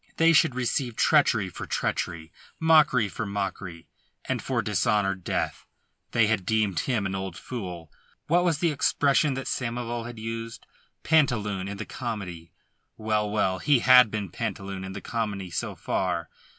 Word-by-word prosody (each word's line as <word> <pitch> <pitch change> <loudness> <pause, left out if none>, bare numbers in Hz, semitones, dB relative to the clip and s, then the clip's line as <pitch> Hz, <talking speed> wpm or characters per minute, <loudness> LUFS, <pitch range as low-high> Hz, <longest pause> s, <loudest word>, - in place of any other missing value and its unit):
They 165 +1 +5
should 155 -4 +4
receive 125 -1 -1
treachery 120 -10 +3
for 90 - -8
treachery, 85 -2 -2 0.3
mockery 155 -8 +5
for 105 +2 -5
mockery, 95 -4 -5 0.4
and - - -2
for - - -1
dishonour 105 -2 +1
death. 95 -2 -3 0.4
They 115 -2 +3
had 105 -3 0
deemed 105 -2 +1
him 115 -7 -1
an 95 - -2
old 95 -2 -4
fool! 90 - -7 0.3
What 175 +3 +3
was 170 -4 +2
the 170 +1 +1
expression 140 0 +2
that 135 - -4
Samoval 120 -1 -3
had 120 -1 -9
used 115 +1 -6 0.4
Pantaloon 105 -11 +2
in 100 0 -5
the - - -5
comedy? 95 -9 -6 0.5
Well, 110 -1 0
well! 95 -3 0
He 140 +3 +3
had 125 -2 +7
been 105 -4 -4
Pantaloon 95 -1 -4
in 95 0 -6
the - - -7
comedy 100 -6 -3
so - - -3
far. 90 -3 -2
110 Hz, 155 wpm, -26 LUFS, 95-125 Hz, 0.5 s, had